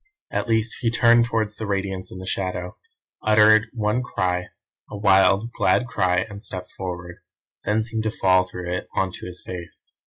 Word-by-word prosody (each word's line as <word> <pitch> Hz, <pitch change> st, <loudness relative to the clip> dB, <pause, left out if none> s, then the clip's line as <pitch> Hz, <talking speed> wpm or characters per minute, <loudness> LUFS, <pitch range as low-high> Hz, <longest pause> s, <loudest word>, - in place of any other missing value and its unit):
At -, -, -1 dB
least 110 Hz, -1 st, +1 dB
he 115 Hz, -, +2 dB
turned 120 Hz, 0 st, +5 dB
towards 110 Hz, -3 st, -1 dB
the 110 Hz, -, -4 dB
Radiance 95 Hz, -2 st, -3 dB
in -, -, -8 dB
the 95 Hz, -, -7 dB
shadow, 90 Hz, -1 st, -3 dB, 0.5 s
uttered 110 Hz, 0 st, +5 dB
one 110 Hz, 0 st, 0 dB
cry; 90 Hz, -6 st, -1 dB, 0.4 s
a 105 Hz, -, -6 dB
wild, 100 Hz, +2 st, +4 dB
glad 125 Hz, -, +2 dB
cry, 90 Hz, -6 st, +1 dB
and 100 Hz, 0 st, -10 dB
stepped 90 Hz, -3 st, -5 dB
forward; 90 Hz, -2 st, -6 dB, 0.5 s
then 110 Hz, +1 st, +1 dB
seemed 110 Hz, -1 st, -3 dB
to -, -, +2 dB
fall 95 Hz, -1 st, +5 dB
through 90 Hz, -1 st, -6 dB
it 90 Hz, -, -3 dB
on 95 Hz, -1 st, +1 dB
to -, -, -8 dB
his 90 Hz, 0 st, -9 dB
face. 90 Hz, -2 st, -7 dB
100 Hz, 180 wpm, -23 LUFS, 90-110 Hz, 0.5 s, turned